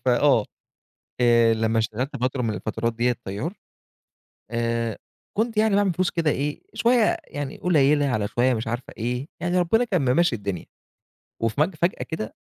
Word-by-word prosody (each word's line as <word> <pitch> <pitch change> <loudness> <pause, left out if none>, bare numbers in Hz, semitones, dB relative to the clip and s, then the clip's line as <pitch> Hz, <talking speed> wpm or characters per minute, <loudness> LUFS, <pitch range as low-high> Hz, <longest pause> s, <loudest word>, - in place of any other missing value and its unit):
فآه 125 -2 +4 0.8
آآ، 115 -1 +5
لمّا 110 0 +1
اشتغلت 115 +5 -2
فترة 130 0 0
من 110 -2 -1
الفترات 110 +2 -2
ديّة 120 +1 +1
طيار 105 - -4 1.0
آآ، 115 -1 -1 0.4
كنت 225 +1 0
يعني 215 -1 +3
باعمل 200 -2 +3
فلوس 185 +2 0
كده 165 -3 +1
إيه 145 +2 -2
شويّة 235 +8 +3
يعني 145 -1 -5
قليلة 145 -4 +3
على 110 -6 0
شويّة 125 +1 +2
مش 110 -1 -3
عارفة 120 +2 -4
إيه 125 +4 -2
يعني 175 +1 +1
ربنا 225 +7 +3
كان 140 - +1
ممشّي 170 -8 +3
الدنيا، 100 -4 -5 0.8
وفج 150 - +1
فجأة 170 +4 0
كده 135 -10 -5
130 Hz, 155 wpm, -24 LUFS, 115-175 Hz, 1.0 s, آآ